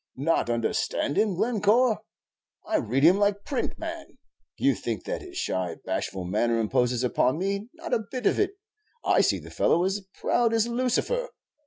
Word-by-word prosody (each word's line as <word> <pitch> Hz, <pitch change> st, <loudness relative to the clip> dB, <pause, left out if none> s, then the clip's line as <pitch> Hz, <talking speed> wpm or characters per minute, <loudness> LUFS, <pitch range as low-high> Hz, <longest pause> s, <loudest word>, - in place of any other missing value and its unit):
"Not 145 Hz, -1 st, +1 dB
understand 120 Hz, +4 st, 0 dB
him, 210 Hz, -3 st, +2 dB
Glencore? 225 Hz, +3 st, +2 dB, 0.7 s
I -, -, +1 dB
read 125 Hz, +6 st, 0 dB
him 180 Hz, +5 st, +6 dB
like 205 Hz, 0 st, +1 dB
print, 275 Hz, -, -2 dB
man. 330 Hz, 0 st, -7 dB, 0.4 s
You -, -, +3 dB
think -, -, -4 dB
that -, -, -4 dB
his 365 Hz, -1 st, -10 dB
shy, 90 Hz, -, -2 dB
bashful 95 Hz, -2 st, -3 dB
manner 115 Hz, +5 st, +1 dB
imposes 125 Hz, +2 st, +1 dB
upon 125 Hz, +2 st, +2 dB
me; 200 Hz, +4 st, -2 dB
not 325 Hz, -6 st, -6 dB
a 220 Hz, -4 st, 0 dB
bit 255 Hz, -2 st, -4 dB
of -, -, +3 dB
it; 400 Hz, -1 st, +1 dB, 0.5 s
I -, -, +4 dB
see -, -, +2 dB
the -, -, -11 dB
fellow 170 Hz, -, +2 dB
is 190 Hz, +2 st, 0 dB
as 190 Hz, -, -21 dB
proud 235 Hz, -1 st, +2 dB
as 225 Hz, -1 st, +3 dB
Lucifer. 255 Hz, -, 0 dB
200 Hz, 175 wpm, -26 LUFS, -, 0.7 s, him